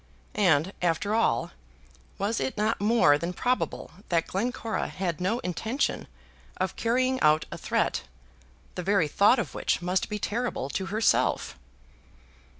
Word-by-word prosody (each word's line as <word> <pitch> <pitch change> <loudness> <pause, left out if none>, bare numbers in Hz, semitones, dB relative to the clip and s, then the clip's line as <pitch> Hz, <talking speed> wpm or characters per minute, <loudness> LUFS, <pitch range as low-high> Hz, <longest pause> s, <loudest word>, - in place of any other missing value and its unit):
And, 180 -3 +2
after 180 +4 0
all, 220 - +1 0.7
was 205 +4 -1
it 260 - -2
not 215 0 0
more 205 -9 +4
than 170 +3 -3
probable 250 +6 -1 0.2
that 165 -2 +2
Glencora 225 +2 -2
had 180 -3 -3
no 195 +6 +1
intention 220 - -2 0.5
of - - -2
carrying 255 +3 +1
out 155 +1 +4
a - - -5
threat - - 0 0.7
the - - -4
very 195 -3 +2
thought 200 - +4
of 235 - -3
which - - 0
must 180 +1 -1
be 210 - -2
terrible 215 - -2
to 190 +5 -3
herself? 215 - +1
200 Hz, 140 wpm, -27 LUFS, 175-230 Hz, 0.7 s, more